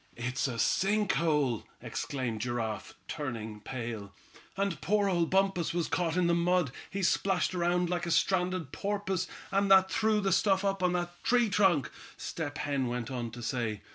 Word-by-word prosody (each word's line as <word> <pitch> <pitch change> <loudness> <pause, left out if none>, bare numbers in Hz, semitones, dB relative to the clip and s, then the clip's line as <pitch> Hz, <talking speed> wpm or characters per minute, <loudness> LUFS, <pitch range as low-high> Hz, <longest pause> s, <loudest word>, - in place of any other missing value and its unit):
"It's 125 +3 -1
a 120 -3 -4
sink 195 - +2
hole!" 150 -8 +1 0.2
exclaimed 120 -6 -3
Giraffe, 115 -2 -3
turning 115 -8 -5
pale. 110 -3 -6 0.4
"And 195 -6 -1
poor 205 +2 +2
old 175 -3 +1
Bumpus 190 -3 +1
was 170 -2 0
caught 175 -1 0
in 180 - +3
the 170 - +3
mud. 170 -3 +2 0.2
He 195 0 -3
splashed 185 +1 +2
around 175 0 +1
like 175 0 -2
a - - -1
stranded 180 -4 +1
porpoise, 195 -2 -2 0.2
and 195 0 +2
that 190 -1 +6
threw 220 -1 +2
the 195 -1 0
stuff 195 -1 +3
up 195 -1 0
on 180 -1 +2
that 175 0 -3
tree 240 -2 +3
trunk," 185 -9 +3 0.3
Step 150 -2 -4
Hen 140 -3 -1
went 120 0 -3
on 120 -2 -3
to 120 +1 -9
say. 115 -4 -2
170 Hz, 170 wpm, -30 LUFS, 125-190 Hz, 0.4 s, that